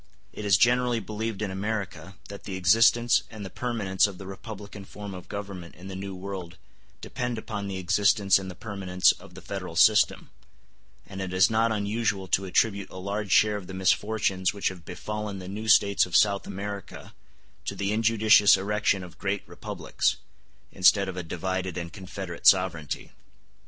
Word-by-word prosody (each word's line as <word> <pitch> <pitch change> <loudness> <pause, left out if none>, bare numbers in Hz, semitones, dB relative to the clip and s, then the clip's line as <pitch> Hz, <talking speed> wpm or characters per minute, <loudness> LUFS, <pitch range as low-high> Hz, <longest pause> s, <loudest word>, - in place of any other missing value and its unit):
It 105 - -7
is 100 -2 +5
generally 120 +1 +3
believed 110 0 -4
in 100 - -2
America 100 -1 -4
that 100 0 -10
the 95 - -5
existence 115 +5 +4
and 110 -3 -8
the 95 - -8
permanence 105 -6 0
of 100 -3 -9
the 95 - -10
republican 100 +1 -9
form 100 0 -9
of 90 -1 -10
government 100 -4 -7
in 90 +3 -11
the 95 - -6
New 95 0 -6
World 95 -2 -7 0.4
depend 125 -1 -4
upon 105 -2 -5
the 95 -1 -4
existence 100 +3 +3
and 95 -1 -7
the 90 - -8
permanence 95 -3 +1
of - - -13
the - - -11
Federal - - -6
system; - - +4 0.7
and 95 -1 -7
it 95 -1 -4
is 95 +2 +4
not 115 +1 +2
unusual 105 -2 -1
to 95 +1 +1
attribute 100 +1 +1
a - - -10
large 100 +2 -4
share 105 -1 +4
of 95 -3 -9
the 95 - -7
misfortunes 95 0 +1
which 100 - 0
have 90 -4 -11
befallen 105 +3 -5
the 90 -1 -8
new 105 +3 -6
States 100 -3 +4
of 85 - -5
South 100 -1 +2
America 100 0 -7 0.5
to - - -3
the 100 0 -1
injudicious 110 -2 +5
erection 100 -1 0
of 90 - -13
great 100 0 -2
republics, - - -2 0.6
instead 95 +1 +4
of 95 - -6
a 90 - -3
divided 95 +1 -3
and 85 -1 -5
confederate 95 -2 -5
sovereignty. 90 -6 +2
100 Hz, 175 wpm, -26 LUFS, 95-105 Hz, 0.7 s, is